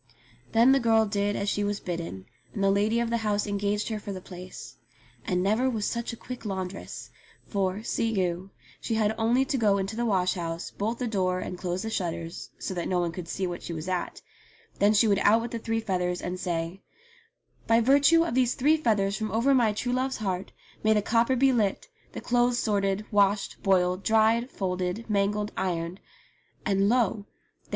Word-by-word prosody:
Then 235 +3 +6
the 275 - +5
girl 225 -2 +4
did 205 0 -1
as 200 - -2
she 205 0 0
was 205 0 -1
bidden, 170 - -5 0.3
and 200 - -1
the 195 - +4
lady 210 +3 +2
of 235 -1 -1
the 235 - +2
house 210 -2 0
engaged 205 +1 -1
her 220 -1 -3
for 205 - -7
the 190 - -5
place. 180 0 -10 0.5
And 180 -3 +1
never 220 +7 +2
was 220 -4 -2
such 235 +1 -2
a - - -6
quick 250 0 -8
laundress; 190 -2 -5 0.3
for, 195 0 -1
see 230 0 0
you, 185 -3 -1 0.3
she 225 - -2
had 215 -1 +2
only 235 +4 +2
to 270 - -1
go 205 -3 +3
into 195 +2 -3
the 240 - -1
wash 185 -3 +2
house, 170 -2 -4
bolt 220 +3 -2
the 250 - -2
door 185 -5 0
and 180 - -5
close 180 +1 -3
the 225 - -4
shutters, 170 -4 -4
so - - -4
that 175 -2 -3
no 180 -1 +1
one 170 -1 -1
should 175 -1 -7
see 190 +3 -2
what 175 -1 -4
she 170 - -6
was 160 +1 -6
at; 180 -1 -3 0.6
then 205 +1 +5
she 215 +2 +5
would 200 -2 +3
out 220 +2 +5
with 235 +1 -5
the 230 - -3
three 225 0 -1
feathers 180 -4 -1
and 180 +1 -4
say, 170 +1 -3 0.9
"By 230 0 +5
virtue 285 +7 +5
of 335 - -3
these 250 -1 +2
three 300 +5 +3
feathers 205 -8 +1
from 215 -1 -3
over 235 +6 +3
my 240 -5 +4
true 245 +4 -2
love's 260 +1 0
heart 190 -3 -3 0.3
may 220 0 +4
the 210 -1 +1
copper 230 +4 +2
be 265 +1 +4
lit, 215 - 0 0.2
the - - -6
clothes 245 0 +2
sorted, 200 -3 0
washed, 200 -1 +2
boiled, 185 -1 +2
dried, 225 +3 +3
folded, 185 +2 -3
mangled, 210 0 0
ironed," 175 -1 -2 0.7
and 200 -1 +2
lo 225 -4 +1
205 Hz, 200 wpm, -27 LUFS, 185-230 Hz, 0.9 s, Then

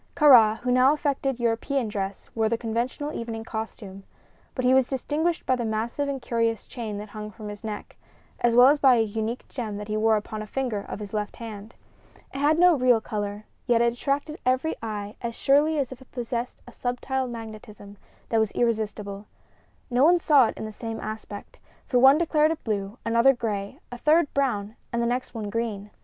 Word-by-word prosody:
Kāra, 235 -8 +7
who 250 - -1
now 255 +3 +5
affected 275 -3 -1
European 235 +2 0
dress, 200 -2 -4
wore 220 -1 +1
the 230 - 0
conventional 240 +6 -3
evening 225 -1 -5
costume; 220 -3 -7 0.5
but 255 - -1
he 255 - +5
was 260 -1 +4
distinguished 305 +5 -1
by 260 - +2
the 245 - -3
massive 230 +6 -2
and 275 -1 -3
curious 230 -2 -1
chain 220 -5 -6
that 210 +1 -7
hung 210 0 -7
from 215 -1 -9
his 205 +1 -9
neck, 215 -2 -6 0.4
as 240 -1 +2
well 245 +1 +8
as 290 +1 +3
by 265 -3 +6
a 225 - +3
unique 220 +2 -4
gem 220 -5 -5
that 210 0 -7
he 215 - -1
wore 220 +1 +3
upon 215 0 -4
a 215 - -7
finger 245 -2 -2
of - - -4
his 205 -1 -8
left 210 -1 -3
hand. 220 -1 -9 0.6
It 275 - -5
had 300 +2 +3
no 355 +1 +6
real 250 -4 +4
color, 205 -1 -4 0.2
yet 240 -2 +4
it 235 0 +3
attracted 285 +5 -2
every 260 +6 +1
eye 210 -2 -5
as 235 -2 -4
surely 295 +3 +3
as 275 -3 -1
if 260 0 -10
it 260 - -17
possessed 240 0 -4
a - - -10
subtile 255 +2 -2
magnetism 215 -3 -9 0.3
that 225 - +2
was 220 -2 +1
irresistible. 210 -3 -2 0.6
No 245 +2 +3
one 345 +4 +6
saw 290 -7 +5
it - - -6
in - - -5
the 215 - -6
same 225 +1 -6
aspect, 215 -1 -8 0.3
for 250 - +2
one 270 +3 +7
declared 310 -2 +3
it 325 - -4
blue, 205 0 -3
another 235 +4 +5
gray, 205 -5 -4
a 245 - -7
third 305 +2 +3
brown 220 -6 -1 0.2
and 235 - -1
the 235 - +1
next 245 +1 -2
one 210 -2 -4
green. 210 -3 -3
235 Hz, 205 wpm, -25 LUFS, 215-265 Hz, 0.6 s, well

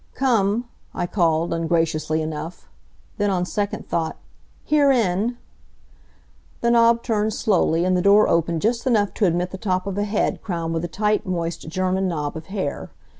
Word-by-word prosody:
"Come!" 235 -3 +1 0.3
I - - -1
called, 170 -3 +1
ungraciously 165 -1 0
enough. 160 +2 -6 0.5
Then, 205 0 +2
on 180 -2 0
second 205 +4 -3
thought: 160 -1 -2 0.5
"Herein!" 240 -7 +2 1.2
The 235 - +2
knob 235 0 +4
turned 215 -2 0
slowly, 175 -4 +2
and 185 0 +2
the 180 - +2
door 200 +3 +5
opened 165 -1 +1
just 235 +3 0
enough 210 -5 +2
to 210 - +1
admit 175 +1 0
the 190 - -7
top 185 -3 -1
of 200 0 -3
a - - +1
head 210 +1 -1
crowned 170 -5 -3
with 165 0 -2
a - - -1
tight, 210 +3 0
moist 170 -3 -3
German 185 +2 0
knob 150 -3 -3
of 160 0 -8
hair. 190 -8 -4
185 Hz, 165 wpm, -22 LUFS, 165-215 Hz, 1.2 s, door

